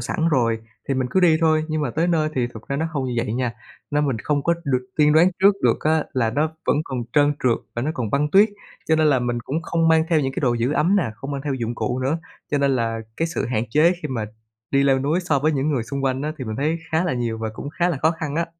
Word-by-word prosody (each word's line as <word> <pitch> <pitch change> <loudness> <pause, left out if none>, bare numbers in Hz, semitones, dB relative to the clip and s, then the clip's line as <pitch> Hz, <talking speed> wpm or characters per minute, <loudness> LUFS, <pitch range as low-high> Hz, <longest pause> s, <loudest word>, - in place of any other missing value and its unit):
sẵn 160 +7 -1
rồi 115 -5 +2 0.3
thì 135 - +1
mình 130 -1 -1
cứ 190 - +2
đi 170 -3 +5
thôi. 155 -1 +3
Nhưng 155 0 -1
mà 125 - -1
tới 165 +6 0
nơi 160 -3 +2
thì 125 -2 +1
thực 115 -2 -12
ra 140 - -1
nó 160 +3 0
không 140 -4 -2
như 125 - -3
vậy 115 -2 -1
nha, 125 0 -1 0.4
nên 150 0 +1
mình 135 -4 0
không 145 +5 -1
có 170 - +2
được 130 -2 0
tiên 150 -1 +4
đoán 170 +4 +5
trước 200 +1 +7
được - - +2
á, 155 0 +2
là 115 -4 +1
nó 155 +5 0
vẫn - - +3
còn 130 -4 -4
trơn 145 -1 +4
trượt 120 -3 +2 0.2
và 120 - -2
nó 150 - 0
còn 115 -5 -3
băng 150 +2 +1
tuyết, 200 +5 +6 0.4
cho 160 - +4
nên 155 0 +3
là 140 -3 +4
mình 120 -1 -1
cũng 150 +7 -3
không 165 0 +1
mang 160 0 +4
theo 160 -3 +3
những 135 -2 -1
cái - - -3
đồ 125 -4 +2
giữ 120 +4 0
ấm 170 +7 +2
nè, 185 - +2
không 135 +5 -7
mang 140 -1 -3
theo 140 - -1
dụng 120 -2 -3
cụ 125 +1 -2
nữa. 135 +6 0 0.3
Cho 145 - +1
nên 140 0 +2
là 115 -1 -1 0.2
cái 165 - 0
sự - - -2
hạn 115 -2 -1
chế 155 +7 +4
khi 150 - -3
mà 120 -5 -2 0.5
đi 140 0 +3
leo 135 -1 +3
núi 150 +7 0
so 160 -6 +1
với 155 +3 +1
những 140 +1 0
người 135 -6 0
xung 135 +4 -4
quanh 130 0 0
á 155 +1 -2
thì 130 - -4
mình 110 -2 -4
thấy 155 +5 0
khá 160 +3 +2
là 180 - 0
nhiều 120 -2 -2
và 110 0 -3
cũng 140 - -6
khá 175 +3 0
là 170 - -1
khó 160 - +5
khăn 160 -4 -4
á. 170 0 0
145 Hz, 295 wpm, -22 LUFS, 125-160 Hz, 0.5 s, trước